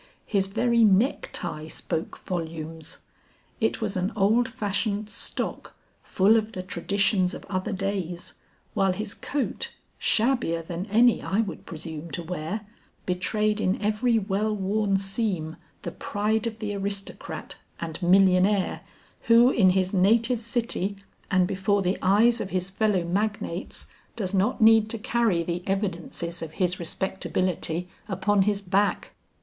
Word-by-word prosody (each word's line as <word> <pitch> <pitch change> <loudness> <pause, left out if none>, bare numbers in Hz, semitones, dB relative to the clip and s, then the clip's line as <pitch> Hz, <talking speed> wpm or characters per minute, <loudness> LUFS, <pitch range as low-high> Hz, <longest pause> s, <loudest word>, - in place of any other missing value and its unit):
His 195 -3 +1
very 235 +3 +2
necktie 195 - +1
spoke 160 0 -4
volumes. 160 -2 -4 0.6
It 225 0 0
was 210 -3 -1
an 185 +3 0
old 220 +4 +3
fashioned 210 -2 -2
stock, - - -2 0.3
full 205 +4 +4
of 220 0 -2
the 185 - -4
traditions 185 +1 +1
of - - -10
other 185 +1 -1
days, 190 -3 -3 0.4
while 195 -1 +2
his 210 +2 -3
coat, 285 -1 -3 0.3
shabbier 220 -9 +1
than 175 +4 -5
any 230 +3 +4
I 200 +4 +1
would 210 - -6
presume 160 0 -7
to 175 - -3
wear, 180 +5 -4 0.4
betrayed 210 +4 0
in 185 -1 +1
every 215 +3 +2
well 210 +1 0
worn 200 0 +1
seam 195 -5 -2 0.3
the - - -4
pride 215 +2 -1
of 220 -1 -5
the 210 -2 -3
aristocrat 200 0 -4 0.2
and 165 +1 -5
millionaire 190 +2 +4 0.5
who 235 +2 +7
in 195 -7 +5
his 185 +1 +1
native 225 +5 +3
city 230 -4 -1 0.3
and 185 -2 +3
before 195 +1 +1
the 185 +2 0
eyes 225 +5 +4
of 190 - -4
his 185 0 -2
fellow 200 -2 +1
magnates 195 0 -2 0.3
does 200 -4 -3
not 200 +7 +1
need 220 -1 +6
to 230 - -1
carry 225 -6 +1
the 170 +1 -3
evidences 175 -3 -3
of 160 -1 -6
his 180 -1 0
respectability 180 -1 -2 0.2
upon 195 +1 +2
his 205 0 +1
back. 200 +2 +1
195 Hz, 140 wpm, -26 LUFS, 180-215 Hz, 0.6 s, who